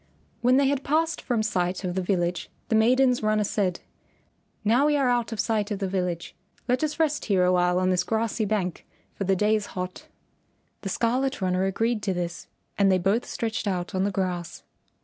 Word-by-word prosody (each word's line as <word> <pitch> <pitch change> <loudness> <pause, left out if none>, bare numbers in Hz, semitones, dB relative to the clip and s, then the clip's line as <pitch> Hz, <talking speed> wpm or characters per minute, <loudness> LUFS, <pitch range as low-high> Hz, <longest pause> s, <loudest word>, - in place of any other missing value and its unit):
When 250 +2 +4
they 280 - +4
had 280 0 0
passed 320 +3 0
from 230 -3 0
sight 180 -3 -1
of 180 -1 -2
the 190 - -1
village 175 -2 -1 0.2
the 225 - +2
maiden's 250 +3 +4
runner 215 0 +2
said, 195 -3 -1 0.8
"Now 245 +7 +4
we 295 -1 +3
are 275 -2 +2
out 240 -1 0
of 225 - -5
sight 215 -2 0
of 205 - -2
the 195 0 -2
village. 180 -3 -3 0.3
Let 250 +4 +1
us 305 +1 -2
rest 305 -2 +1
here 190 -3 +2
a 180 - +3
while 180 0 +2
on 185 0 +2
this 180 -1 +2
grassy 225 +1 -1
bank, 195 -5 -2 0.3
for 200 - -4
the 195 +1 +2
day 210 +3 +2
is 210 -1 -2
hot." 180 0 -5 0.7
The 195 - -4
Scarlet 255 +7 0
Runner 185 -1 +1
agreed 225 +3 0
to 195 -2 -1
this 175 -1 -4 0.3
and 195 -1 +5
they 185 - +4
both 195 +6 0
stretched 220 -2 -3
out 180 0 -2
on 185 0 +1
the 200 - +1
grass. 180 -3 -3
205 Hz, 205 wpm, -26 LUFS, 185-235 Hz, 0.8 s, and